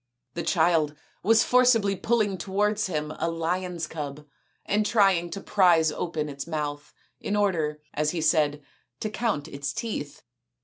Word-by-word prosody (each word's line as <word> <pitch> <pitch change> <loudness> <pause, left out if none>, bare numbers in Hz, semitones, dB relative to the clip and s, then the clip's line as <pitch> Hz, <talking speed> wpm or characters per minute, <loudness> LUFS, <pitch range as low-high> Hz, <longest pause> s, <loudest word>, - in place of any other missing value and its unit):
The 170 - -3
child 160 -4 +2 0.3
was 225 +3 +4
forcibly 240 -6 +4
pulling 205 -1 0
towards 205 +3 0
him 155 -3 -3
a 165 - 0
lion's 170 +1 -2
cub 150 -2 -6 0.4
and 210 +1 +1
trying 195 -5 +3
to 170 - -5
prise 170 -5 +4
open 155 -1 -3
its 140 0 -6
mouth 150 -2 -4 0.3
in 210 - -2
order, 160 -7 0
as 150 +1 0
he 170 - -2
said, 150 -2 +2 0.2
" - - -48
to 215 - -2
count 205 -9 -1
its 140 -2 -4
teeth." 150 -7 -5
170 Hz, 150 wpm, -26 LUFS, 150-205 Hz, 0.4 s, was